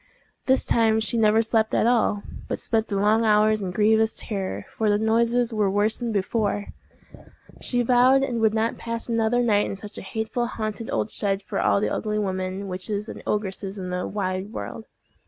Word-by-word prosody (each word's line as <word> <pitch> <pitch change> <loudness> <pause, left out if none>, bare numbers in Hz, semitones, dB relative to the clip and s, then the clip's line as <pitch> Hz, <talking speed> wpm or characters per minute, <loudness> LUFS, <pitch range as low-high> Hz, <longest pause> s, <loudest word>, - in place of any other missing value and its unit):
This 265 0 +3
time 220 -1 +3
she 220 +2 -2
never 220 0 +4
slept 220 -1 +1
at - - +3
all, 230 -4 +2 0.2
but - - -2
spent 225 -1 0
the 200 - -3
long 210 +3 +3
hours 215 0 +3
in 190 - -3
grievous 220 +3 +2
terror, 195 -3 -4
for 220 -1 +1
the 205 - +3
noises 230 +2 +1
were 210 -2 +1
worse 205 +3 +1
than 235 -1 -3
before. 205 0 -1 0.9
She 245 -1 +1
vowed 255 +3 +4
she 270 - -5
would 225 -2 +2
not 225 +1 0
pass 230 0 -4
another 230 +1 +1
night 210 -3 +2
in - - -4
such 205 +1 -8
a - - -7
hateful 220 +4 -3
haunted 220 -1 -5
old 210 - -1
shed 195 -1 -1
for - - -3
all - - +3
the 205 - -1
ugly 210 -1 -2
women, 190 -1 -2
witches, 200 +3 -4
and - - -8
ogresses 200 -1 -2
in 185 -2 -5
the 180 0 -2
wide 190 0 -3
world. 225 - -7
215 Hz, 190 wpm, -24 LUFS, 200-230 Hz, 0.9 s, never